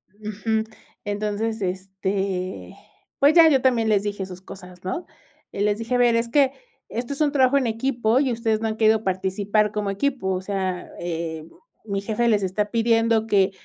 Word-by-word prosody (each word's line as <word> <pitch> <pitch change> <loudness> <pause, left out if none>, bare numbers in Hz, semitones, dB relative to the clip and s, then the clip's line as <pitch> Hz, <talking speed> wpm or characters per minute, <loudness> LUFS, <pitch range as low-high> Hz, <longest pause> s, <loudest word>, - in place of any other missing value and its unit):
Ujú. 215 +1 -2 0.4
Entonces, 210 +2 -2
este, 190 - -3 0.4
pues 285 +2 +5
ya, 330 -1 +8
yo 270 -3 +3
también 235 -4 +2
les 205 -2 +3
dije 205 -2 -3
sus 185 -1 -10
cosas, 185 -2 -12
¿no?, 190 - -3 0.5
eh, 200 - -4
les 210 0 +2
dije: 230 +3 -2
"A - - +3
ver, 240 -1 +4
es 230 0 +1
que 275 0 +4 0.4
esto 240 +5 -4
es 280 - -5
un 295 -2 +3
trabajo 270 -1 +4
en 260 -4 +1
equipo 235 0 +1
y 270 -3 +1
ustedes 225 -2 0
no 225 - 0
han 220 - -3
querido 220 0 +3
participar 195 +3 0
como 210 -1 -2
equipo, 245 -1 -1
o 185 - -2
sea, 190 -2 -3
eh, 165 -2 -4 0.4
mi 200 -2 -2
jefe 220 +3 0
les 210 -4 +3
está 205 +3 -1
pidiendo 230 -1 +2
que 195 -3 +3
215 Hz, 185 wpm, -23 LUFS, 190-230 Hz, 0.5 s, ya